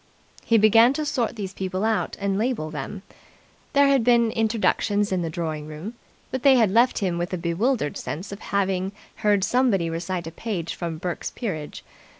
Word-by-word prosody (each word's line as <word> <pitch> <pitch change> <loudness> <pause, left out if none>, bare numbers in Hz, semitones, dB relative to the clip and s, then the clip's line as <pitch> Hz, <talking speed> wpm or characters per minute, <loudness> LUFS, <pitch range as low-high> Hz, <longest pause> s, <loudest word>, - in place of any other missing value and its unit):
He 230 - +3
began 225 +4 +6
to 305 +2 -2
sort 245 -5 -1
these 195 -3 -5
people 190 +2 -2
out 220 -1 0
and 200 -1 0
label 215 -8 -1
them. 160 +7 -6 0.7
There 280 0 +5
had 275 -3 +3
been 235 -1 +4
introductions 215 -2 +1
in 185 -1 0
the 165 - -2
drawing 155 -2 -4
room, 155 +9 -7 0.4
but 260 - -2
they 275 0 +6
had 225 -6 +4
left 235 +4 +4
him 180 -5 -1
with 175 +1 -3
a - - 0
bewildered 170 - 0
sense 180 +7 -5
of 200 - -7
having 195 -1 -1 0.2
heard 205 -2 +2
somebody 195 -6 +2
recite 170 +1 -3
a 165 - -6
page 175 -3 -4
from 170 -2 -4
Burke's 175 +1 -4
peerage. 160 -11 -5
200 Hz, 180 wpm, -24 LUFS, 170-230 Hz, 0.7 s, began